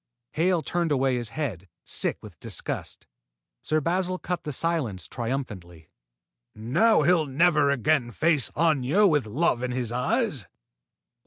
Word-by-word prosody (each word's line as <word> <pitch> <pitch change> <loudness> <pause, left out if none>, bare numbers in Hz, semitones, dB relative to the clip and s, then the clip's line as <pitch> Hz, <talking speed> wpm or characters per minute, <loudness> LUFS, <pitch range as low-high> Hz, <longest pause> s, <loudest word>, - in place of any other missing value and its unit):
Hale 170 0 +1
turned 170 -2 -1
away 135 -2 +2
his 120 -3 -3
head, 110 - -4 0.2
sick - - -1
with - - -12
disgust. - - -5 0.6
Sir 155 - 0
Basil 180 +4 -1
cut 180 -1 -4
the 150 - -3
silence 135 - -2
triumphantly: 105 - -5 0.7
"Now 125 - +3
he'll 170 -3 +3
never 150 +1 +3
again 140 -1 +1
face 150 - +2
Aña 160 +4 +3
with 145 - +1
love 125 +2 0
in 125 - -2
his 125 -2 -2
eyes!" 140 - -1
145 Hz, 135 wpm, -26 LUFS, 120-170 Hz, 0.7 s, Now